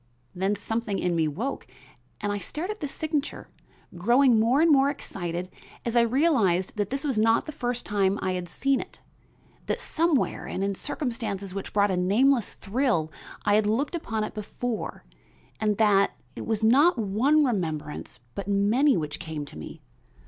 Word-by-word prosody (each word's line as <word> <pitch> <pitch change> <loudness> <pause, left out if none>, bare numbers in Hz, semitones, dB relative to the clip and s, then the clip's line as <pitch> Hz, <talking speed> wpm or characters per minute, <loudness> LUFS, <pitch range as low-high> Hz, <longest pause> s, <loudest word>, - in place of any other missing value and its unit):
Then 195 +3 0
something 215 0 -2
in 175 -1 0
me 160 -2 +2
woke 220 - -4 0.5
and 205 - -2
I 205 - -2
stared 310 - -4
at 425 - -7
this 290 -3 -4
signature, 310 -2 -3 0.5
growing 240 +6 +4
more 235 +5 +3
and 330 0 +5
more 275 -1 +5
excited 175 - -4 0.4
as 235 0 -2
I 235 - +6
realized 235 - +2
that 205 -2 0
this 275 +2 -3
was 270 -7 0
not 225 +1 +3
the 310 - -5
first 245 -4 -3
time 200 -1 +1
I 185 - -1
had 180 -1 -4
seen 275 -1 +1
it, - - -8 0.7
that - - -1
somewhere 325 -4 0
and 190 - -3
in 200 0 0
circumstances 205 -5 -4
which 195 0 -5
brought 205 -1 +3
a 185 - 0
nameless 230 +7 +2
thrill 205 - 0 0.3
I 205 - +3
had 210 0 +3
looked 255 +10 0
upon 225 -10 -2
it - - -4
before 220 +2 -4 0.5
and 210 -2 +1
that 205 -3 +3 0.2
it - - -6
was 220 -1 -1
not 275 +8 +5
one 240 +9 +3
remembrance 160 - -3
but 200 -1 -5
many 215 +8 +3
which 150 -2 -4
came 155 -2 -5
to - - -12
me. 80 - -9
215 Hz, 175 wpm, -26 LUFS, 195-270 Hz, 0.7 s, I